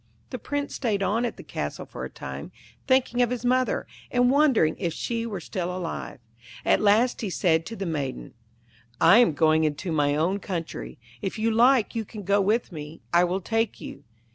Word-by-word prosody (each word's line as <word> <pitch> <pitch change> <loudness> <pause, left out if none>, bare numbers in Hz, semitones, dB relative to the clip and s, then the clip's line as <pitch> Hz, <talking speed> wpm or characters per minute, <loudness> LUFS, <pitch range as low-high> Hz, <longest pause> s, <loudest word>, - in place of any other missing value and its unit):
The 255 - -4
Prince 285 +5 -3
stayed 215 -7 -1
on 215 +6 +1
at 235 - -4
the - - -10
castle - - -5
for - - -8
a - - -7
time, - - -8 0.4
thinking 260 -2 +2
of 245 - +3
his 250 -1 -3
mother, 255 +1 +1 0.2
and 245 0 +3
wondering 270 - +3
if 170 -4 -1
she 230 -1 -3
were 205 -5 -4
still 175 +1 -4
alive. 170 -4 -5 0.5
At - - +3
last 215 +4 +3
he 215 - -2
said 165 -3 +1
to 225 - -6
the 195 - -4
Maiden, 145 -6 -4 0.7
'I 210 - +7
am 210 -10 +4
going 155 +1 +3
into 155 +3 -2
my 145 -2 +2
own 175 +6 +1
country. 175 -5 -5 0.2
If 195 +1 -3
you 225 +1 +1
like 240 +1 +4
you 225 - -2
can 210 0 -9
go 200 +2 +2
with 215 +4 +1
me; 155 -1 -8
I 175 +1 +6
will 185 +2 -2
take 225 +2 -1
you.' 140 - -9
205 Hz, 195 wpm, -26 LUFS, 170-240 Hz, 0.7 s, I